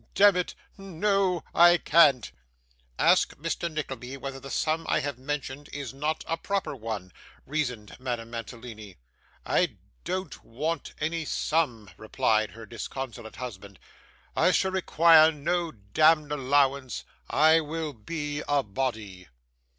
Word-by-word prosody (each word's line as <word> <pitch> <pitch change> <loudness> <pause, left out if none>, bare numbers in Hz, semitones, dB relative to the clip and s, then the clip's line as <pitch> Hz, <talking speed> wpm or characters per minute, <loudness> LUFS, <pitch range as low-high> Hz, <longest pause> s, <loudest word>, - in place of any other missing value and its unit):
Demmit, 195 -3 +4 0.2
no 195 -1 0
I 175 +1 +7
can't.' 150 - +4 0.7
'Ask - - +3
Mr. 165 +2 -3
Nickleby 135 -4 -5
whether 135 0 -6
the 135 - -10
sum 160 +3 -1
I - - +3
have 145 -3 -4
mentioned 145 +1 -5
is 140 -3 -6
not 150 +3 -2
a 165 - -1
proper 200 -3 -2
one,' 110 -6 -5 0.3
reasoned 125 -8 -3
Madame 120 -3 -4
Mantalini. 115 -3 -8 0.5
'I - - +1 0.3
don't 185 - -4
want 155 +7 -4
any 160 +1 -1
sum,' 135 - -1
replied 110 0 +1
her 115 +5 -11
disconsolate 120 0 -7
husband; 100 -6 -8 0.6
'I - - +4
shall 190 - +2
require 165 -3 +6
no 170 +3 -1
demd 150 +9 +2
allowance. 140 -2 +1 0.3
I 160 +2 +5
will 160 -1 -4
be 145 +5 -4
a 145 -1 +2
body. 105 -5 -4
145 Hz, 125 wpm, -27 LUFS, 120-160 Hz, 0.7 s, I